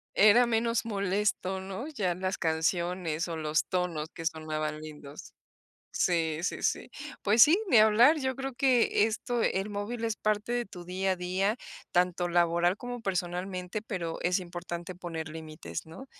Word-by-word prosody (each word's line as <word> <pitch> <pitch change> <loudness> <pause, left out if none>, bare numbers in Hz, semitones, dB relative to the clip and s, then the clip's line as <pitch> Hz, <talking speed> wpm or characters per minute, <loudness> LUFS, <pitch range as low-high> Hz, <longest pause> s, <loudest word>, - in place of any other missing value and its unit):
Era 215 +4 +7
menos 230 0 +1
molesto, 200 -2 -1
¿no? 195 +8 -6
Ya 205 - -1
las 185 +2 -2
canciones 170 0 0
o 165 - -4
los 155 0 0
tonos 170 -4 -2
que 165 - -8
sonaban 155 -1 -3
lindos. 150 -2 -10 0.6
Sí, 160 -3 +1
sí, - - -2
sí. - - -1 0.3
Pues 215 +3 +5
sí, 330 +6 +7
ni 245 - +5
hablar, 225 +8 +6
yo 260 -2 -1
creo 270 -1 -5
que 250 -5 +3
esto 230 +2 -1
el 195 +2 0
móvil 210 +3 -4
es 225 -1 -1
parte 215 +2 -1
de 240 0 0
tu 180 -4 -11
día 190 +2 -1
a - - -2
día, 185 +5 0 0.3
tanto 180 0 +1
laboral 175 +2 +2
como 245 -1 -6
personalmente, 180 +1 -3
pero 175 -7 -4
es 180 +2 +2
importante 175 0 -6
poner 165 -3 -5
límites, 155 - -7
¿no? 165 +12 -11
185 Hz, 160 wpm, -29 LUFS, 170-215 Hz, 0.6 s, Era